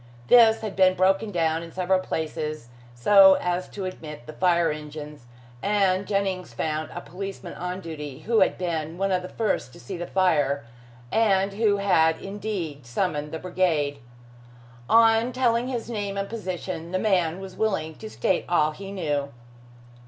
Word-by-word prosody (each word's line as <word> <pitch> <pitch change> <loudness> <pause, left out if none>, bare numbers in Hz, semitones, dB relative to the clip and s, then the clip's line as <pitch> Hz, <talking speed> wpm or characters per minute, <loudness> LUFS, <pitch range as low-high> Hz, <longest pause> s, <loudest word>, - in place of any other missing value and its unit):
This 225 -2 +7
had 215 -3 -5
been 185 -1 +4
broken 195 +4 +2
down 165 -3 0
in 165 0 -9
several 185 +1 +1
places 155 -6 -4 0.3
so 190 +9 +7
as 180 +1 -2
to 195 -2 -6
admit 150 -8 -7
the 155 - -9
fire 170 -1 +2
engines, 150 -3 -8 0.3
and 195 -1 +1
Jennings 190 - -2
found 155 +4 -2
a 175 - -6
policeman 195 -1 -7
on 180 +1 -5
duty 150 -4 -7
who 225 +5 +2
had 190 - +3
been 165 -2 -3
one 195 +1 0
of 185 -1 +1
the 180 - -8
first 220 - -1
to - - -13
see 120 - -7
the 175 - -5
fire, 145 -8 +1 0.5
and 195 -3 +2
who 205 -1 +2
had 160 -5 +3
indeed 195 -8 -5
summoned 150 +1 -2
the 160 - -3
brigade. 160 -5 0 0.9
On 225 +1 +5
telling 245 -1 +1
his 245 -3 -3
name 205 -4 -3
and 195 0 -2
position, 185 -5 -5
the 185 - 0
man 185 -4 +1
was 190 -1 -9
willing 195 -8 -1
to 220 - -8
state 190 -3 0
all 155 -3 +3
he 195 +5 -9
knew. 145 -7 -2
185 Hz, 165 wpm, -25 LUFS, 160-200 Hz, 0.9 s, This